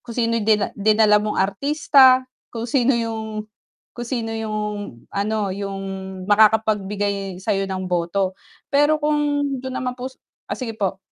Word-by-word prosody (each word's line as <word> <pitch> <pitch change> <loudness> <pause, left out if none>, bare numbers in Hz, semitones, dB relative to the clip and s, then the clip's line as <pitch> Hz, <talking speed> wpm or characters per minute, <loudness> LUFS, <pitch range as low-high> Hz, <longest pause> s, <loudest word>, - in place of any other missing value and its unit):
kung 235 -2 -10
sino 230 -1 +1
yung 210 - -4
dina 210 -2 +3
dinala 210 0 +4
mong 210 0 -2
artista, 260 +5 +4 0.2
kung 230 0 -5
sino 245 +1 +2
yung 220 -2 -3 0.5
kung 240 -1 -7
sino 230 -3 -2
yung 220 -1 -3 0.5
ano, 205 -1 -1
yung 195 0 -5 0.4
makakapagbigay 205 -2 +2
sayo 195 +1 -1
ng 190 0 -3
boto, 180 +2 0 0.4
pero 295 +2 +4
kung 295 -1 +1 0.2
dun 260 0 -5
naman 250 -1 -2
po 250 +1 -6 0.4
ah, - - -3
sige 245 -4 -4
po. 195 -3 -2
220 Hz, 145 wpm, -22 LUFS, 200-250 Hz, 0.5 s, dinala